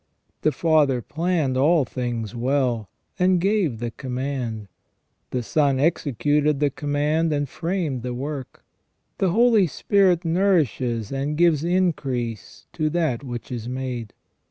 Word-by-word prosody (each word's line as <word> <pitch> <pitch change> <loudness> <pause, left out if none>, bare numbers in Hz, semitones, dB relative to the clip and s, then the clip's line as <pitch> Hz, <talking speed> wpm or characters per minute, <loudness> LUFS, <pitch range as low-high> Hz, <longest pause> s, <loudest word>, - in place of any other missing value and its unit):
The 155 - +3
Father 150 -6 +2
planned 160 - 0
all 150 +2 +4
things 120 -3 -4
well, 125 -3 0 0.3
and 180 0 +4
gave 190 - +1
the 120 +1 -4
command; 125 -3 -4 0.6
the 125 -1 -2
Son 140 +3 +1
executed 145 -1 +1
the 145 -1 +2
command 150 +4 0
and 145 -1 0
framed 165 -4 -2
the 125 0 -4
work; 135 0 -6 0.5
the 190 - +2
Holy 225 0 +4
Spirit 185 +2 +2
nourishes 155 - +1
and 140 +2 -2
gives 165 -3 +3
increase 140 - -1
to 155 0 0
that 155 -6 0
which 120 -1 -7
is 120 -1 -4
made. 125 -4 -4
145 Hz, 130 wpm, -23 LUFS, 125-165 Hz, 0.6 s, all